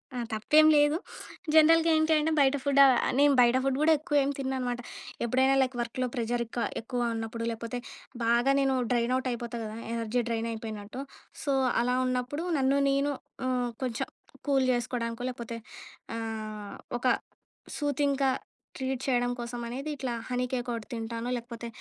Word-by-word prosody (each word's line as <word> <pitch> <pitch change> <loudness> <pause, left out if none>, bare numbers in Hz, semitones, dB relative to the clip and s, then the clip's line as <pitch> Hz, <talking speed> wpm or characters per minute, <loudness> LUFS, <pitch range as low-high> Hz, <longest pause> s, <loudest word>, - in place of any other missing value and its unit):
ఆ! - - -3 0.2
తప్పేం 300 +9 +5
లేదు. 295 +2 +4 0.6
జనరల్‌గా 325 +1 +6
ఏంటి 315 +1 +2
అంటే 305 +1 +1
బయట 275 0 +4
ఫుడ్ 280 -1 +2 0.4
నేను 285 0 +6
బయట 240 0 +5
ఫుడ్ 270 -1 +1
కూడా 320 +1 +6
ఎక్కువ 310 -1 -3
ఏమి 280 +1 -1
తినననమాట. 255 -2 -2 0.4
ఎప్పుడైనా 260 +3 +3
లైక్ 260 -1 0
వర్క్‌లో 245 +2 -2
ప్రెషర్ 240 0 0
ఎక్కువ 235 +1 -3 0.2
ఎక్కువ 245 +2 -4 0.2
ఉన్నప్పుడు, 225 +1 -4
లేపోతే 230 +2 -4 0.5
బాగా 235 +3 +3
నేను 270 -1 +2 0.2
డ్రైన్ 240 0 +2
అవుట్ 260 0 -2
అయిపోతా 235 0 -4
కదా! 215 0 -6 0.2
ఎనర్జీ 230 +1 0
డ్రైన్ 230 0 -1
అయిపోయినట్టు. 220 +2 -6 0.4
సో, 280 - +1 0.3
అలా 250 +1 +1
ఉన్నప్పుడు 255 +6 -2
నన్ను 270 +1 +3
నేను 275 +1 +2 0.4
ఆహ్, 250 -1 0
కొంచెం 240 -3 -2 0.4
కూల్ 270 -2 +3
చేసుకోవడానికో, 235 -1 -2
లేపోతే 235 -1 -6 0.6
ఆహ్, 215 -2 -5 0.2
ఒక 255 - 0 0.7
సూతింగ్‌గా 280 -2 +1 0.5
ట్రీట్ 260 -1 -2
చేయడం 245 -2 +1
కోసం 240 0 -5
అనేది 265 +6 -5
ఇట్లా 260 -3 -3 0.2
హనీ 250 0 0
కేక్ 250 -1 -2
ఒకటి 230 -2 -5
తింటాను. 230 0 -4
లేకపోతే 235 -1 -6
250 Hz, 150 wpm, -29 LUFS, 235-275 Hz, 0.7 s, జనరల్‌గా